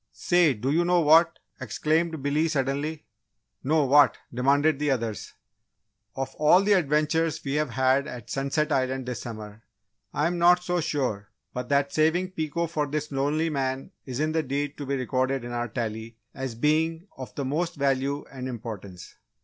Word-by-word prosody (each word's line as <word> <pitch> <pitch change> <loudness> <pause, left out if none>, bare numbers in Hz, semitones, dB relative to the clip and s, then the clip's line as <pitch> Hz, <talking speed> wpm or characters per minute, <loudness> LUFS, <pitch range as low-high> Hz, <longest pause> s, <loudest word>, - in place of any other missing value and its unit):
"Say, 175 -6 +3
do 125 +6 -2
you 165 +4 +3
know 175 0 +3
what?" 160 +2 +5 0.2
exclaimed 155 +6 -1
Billy, 150 +3 +1
suddenly. 145 +1 -2 0.6
"No, 150 +2 +2
what?" 140 -3 +5 0.2
demanded 140 +4 +2
the 150 0 0
others. 115 -5 -2 0.8
"Of 135 0 -4
all 155 +6 +5
the 205 +1 +4
adventures 155 -1 +1
we've 150 +1 0
had 130 +3 +2
at 120 -3 -8
Sunset 140 +3 -1
Island 130 -1 0
this 125 -1 -4
summer, 110 -2 -8 0.5
I'm 170 +4 0
not 180 +1 +5
so 180 -1 0
sure 125 -10 -2 0.2
but 125 0 -5
that 140 0 +1
saving 170 +4 +2
Pico 165 -1 -2
for 155 -3 -2
this 150 +1 -3
lonely 150 +4 0
man 135 -2 -2 0.2
isn't 145 +5 -1
the 160 0 +1
deed 145 0 -3
to 145 - -5
be 140 - 0
recorded 130 0 -1
in 120 - -6
our 120 0 -2
Tally 110 -1 -5 0.2
as 135 -3 -5
being 160 +6 +1
of 130 -5 -9
the 140 - -3
most 165 +6 -1
value 140 0 0
and 130 -1 -6
importance!" 105 -7 -8
140 Hz, 165 wpm, -26 LUFS, 130-155 Hz, 0.8 s, what